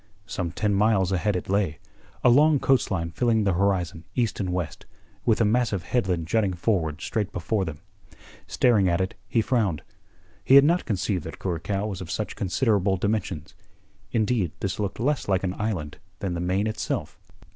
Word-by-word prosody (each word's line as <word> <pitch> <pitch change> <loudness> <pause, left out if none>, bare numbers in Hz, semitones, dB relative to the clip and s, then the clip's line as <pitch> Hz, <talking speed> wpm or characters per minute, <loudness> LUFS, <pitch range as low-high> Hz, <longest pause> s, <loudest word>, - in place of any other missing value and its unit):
Some 90 -4 -3
ten 105 +4 -1
miles 100 -2 +3
ahead 95 +2 +1
it 90 - -3
lay, 95 -6 0 0.5
a - - +6
long 150 +4 +5
coast 135 -1 +2
line 85 -4 -2
filling 115 +1 +2
the 100 -2 +2
horizon 90 -3 0
east 115 -4 0
and 95 -3 -1
west, 90 -3 -4 0.4
with 115 - +3
a 115 - +4
massive 110 -4 +1
headland 95 -9 0
jutting 100 +1 +1
forward 85 -5 -1
straight 105 -3 -2
before 95 +2 -1
them. 80 -3 -7 0.7
Staring 105 -7 +3
at 85 +1 +1
it, 95 0 -1
he 115 - +1
frowned. 105 - 0 0.6
He 135 - +5
had 140 0 +9
not 170 +4 +2
conceived 95 -3 -1
that 80 - -7
Curacao 95 +3 -2
was 100 -3 -4
of 85 - -7
such 105 +4 -3
considerable 100 -1 +1
dimensions. 100 -6 -2 0.6
Indeed, 110 -6 +1
this 95 0 -3
looked 100 -1 -3
less 145 +4 0
like 95 -2 +1
an 90 -1 -1
island 90 -9 -3 0.2
than 95 -2 -3
the 85 - -3
main 95 +4 0
itself. 110 - -3
100 Hz, 180 wpm, -25 LUFS, 90-110 Hz, 0.7 s, had